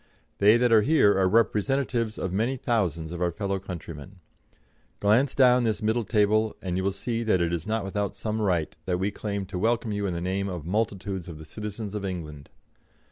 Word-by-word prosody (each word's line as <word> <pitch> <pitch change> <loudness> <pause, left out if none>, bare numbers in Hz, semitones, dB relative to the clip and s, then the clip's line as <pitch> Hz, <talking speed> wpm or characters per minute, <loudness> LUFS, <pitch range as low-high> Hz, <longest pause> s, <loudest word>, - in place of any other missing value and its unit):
They 105 +3 +6
that 120 0 +2
are 110 -1 +7
here 125 -5 +4
are 95 -1 +3
representatives 115 +1 +1
of 95 - -3
many 115 +7 0
thousands 85 - -1
of 85 0 -6
our 90 -1 +1
fellow 100 +1 -2
countrymen. 85 -2 -8 0.8
Glance 110 +7 +3
down 125 -2 +5
this 110 -1 -1
middle 110 +1 +1
table, 110 +1 +2
and 90 -2 -3
you 95 - -1
will 100 - +1
see 115 +4 -3
that 110 -5 +2
it 85 0 0
is 85 +1 -3
not 110 -1 0
without 100 0 -2
some 110 0 -3
right 90 -7 0
that 90 -1 0
we 95 +3 -1
claim 100 -2 -4
to 95 -1 -5
welcome 115 +2 +1
you 100 -1 -1
in 90 - -2
the - - -2
name 95 +3 -2
of 90 -5 -6
multitudes 100 -2 -2
of 85 -3 -8
the 80 - -10
citizens 105 +4 -6
of 105 -1 -4
England. 75 -7 -6
100 Hz, 205 wpm, -26 LUFS, 90-110 Hz, 0.8 s, are